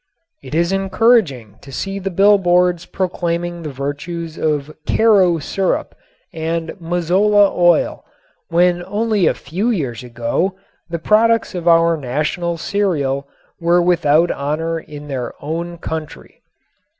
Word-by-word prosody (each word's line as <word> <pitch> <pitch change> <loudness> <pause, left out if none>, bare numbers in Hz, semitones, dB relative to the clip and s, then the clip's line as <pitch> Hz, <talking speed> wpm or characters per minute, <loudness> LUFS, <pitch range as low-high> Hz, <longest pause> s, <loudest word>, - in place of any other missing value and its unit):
It - - -7
is 170 +2 +2
encouraging 195 - +1
to 135 - -12
see 195 +7 -4
the 195 0 -3
bill 200 +3 +4
boards 180 -1 +2
proclaiming 175 -2 -2
the 155 - -5
virtues 145 +4 -5
of 150 -1 -1
"Karo" 195 -6 +4
syrup 185 +5 -2 0.4
and 165 0 -3
"Mazola" 185 +5 +3
oil 175 -1 +2 0.5
when 175 +1 +2
only 210 -2 +1
a - - +2
few 185 - -2
years 135 - -2
ago 120 +11 -2 0.3
the 170 - -2
products 220 +5 +2
of 175 -2 -5
our 165 0 +4
national 150 +6 -2
cereal 145 -8 -1 0.3
were 170 +1 +3
without 170 -2 +3
honor 160 +4 -2
in 150 -2 -10
their 130 -4 -4
own 170 +3 -4
country. 160 -2 -7
170 Hz, 125 wpm, -18 LUFS, 155-190 Hz, 0.5 s, bill